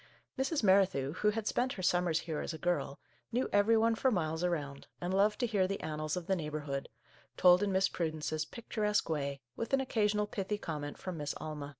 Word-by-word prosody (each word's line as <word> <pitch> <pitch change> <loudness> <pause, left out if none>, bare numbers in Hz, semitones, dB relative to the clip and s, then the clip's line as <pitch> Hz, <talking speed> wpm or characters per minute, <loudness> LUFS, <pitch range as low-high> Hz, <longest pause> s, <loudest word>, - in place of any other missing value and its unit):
Mrs. 270 +1 0
Merrithew, 190 -8 +3
who 210 +4 +2
had 215 0 -2
spent 255 +4 0
her 185 - -6
sum 180 0 +3
mers 165 -2 +1
here 160 -2 -3
as 160 - -4
a - - -6
girl, 175 -5 -1 0.3
knew 245 +2 +1
every 205 +3 +5
one 225 +1 +3
for 260 +4 +2
miles 160 -6 -1
around, 145 -6 -2
and 175 +1 -2
loved 205 +2 +3
to - - +3
hear 205 -5 +2
the 195 +1 -3
annals 155 +1 -3
of 175 - -4
the 190 - +1
neighbourhood, 150 -4 -4 0.5
told 180 +1 +7
in 205 -1 +1
Miss 190 +1 +3
Prudence's 155 -2 -2
pic 235 +8 -11
turesque 210 -5 0
way, 140 -2 -2
with 230 - -4
an 270 - +5
occasional 210 -5 +1
pithy 205 0 -3
com 160 -7 -4
ment 145 0 -6
from 185 -3 -5
Miss 145 -1 -3
Alma. 150 -2 -6
180 Hz, 220 wpm, -33 LUFS, 155-210 Hz, 0.5 s, told